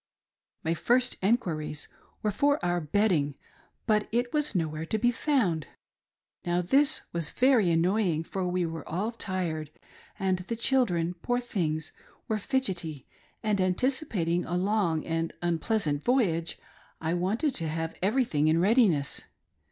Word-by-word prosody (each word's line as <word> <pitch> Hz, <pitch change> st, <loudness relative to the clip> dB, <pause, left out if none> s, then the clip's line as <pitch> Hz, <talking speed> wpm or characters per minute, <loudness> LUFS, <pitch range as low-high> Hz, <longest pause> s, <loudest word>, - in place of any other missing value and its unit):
My 160 Hz, -, +1 dB
first 245 Hz, +8 st, +2 dB
enquiries 165 Hz, -8 st, -1 dB, 0.4 s
were 210 Hz, -, +1 dB
for 285 Hz, +8 st, +2 dB
our 175 Hz, 0 st, +1 dB
bedding; 155 Hz, -4 st, +1 dB, 0.5 s
but 215 Hz, -1 st, +2 dB
it 240 Hz, +2 st, 0 dB
was 300 Hz, -5 st, 0 dB
no 165 Hz, -3 st, +2 dB
where 155 Hz, +1 st, -5 dB
to 190 Hz, +7 st, -1 dB
be 240 Hz, +3 st, +3 dB
found. 230 Hz, -, 0 dB, 0.8 s
Now 175 Hz, +1 st, 0 dB
this 275 Hz, +10 st, +4 dB
was 170 Hz, -3 st, -1 dB
very 250 Hz, -7 st, +3 dB
annoying, 170 Hz, 0 st, +2 dB
for 185 Hz, +2 st, -3 dB
we 180 Hz, 0 st, 0 dB
were 165 Hz, 0 st, -6 dB
all 200 Hz, +8 st, -1 dB
tired 175 Hz, -8 st, -3 dB, 0.5 s
and 190 Hz, -1 st, 0 dB
the 185 Hz, +6 st, -4 dB
children, 215 Hz, -9 st, +2 dB
poor 245 Hz, 0 st, 0 dB
things, 160 Hz, -10 st, -2 dB, 0.4 s
were 215 Hz, -1 st, 0 dB
fidgetty; 185 Hz, -, -2 dB, 0.4 s
and 210 Hz, -3 st, +1 dB
anticipating 185 Hz, -, 0 dB
a 175 Hz, -, -2 dB
long 185 Hz, -5 st, +1 dB
and 165 Hz, 0 st, -2 dB
unpleasantt 170 Hz, -3 st, 0 dB
voyage 185 Hz, -10 st, +1 dB, 0.4 s
I 160 Hz, +1 st, -1 dB
wanted 205 Hz, -, 0 dB
to 165 Hz, -7 st, -1 dB
have 165 Hz, +1 st, -3 dB
everything 195 Hz, -, +2 dB
in 160 Hz, +1 st, +3 dB
readiness. 190 Hz, -, +2 dB
185 Hz, 140 wpm, -28 LUFS, 165-230 Hz, 0.8 s, this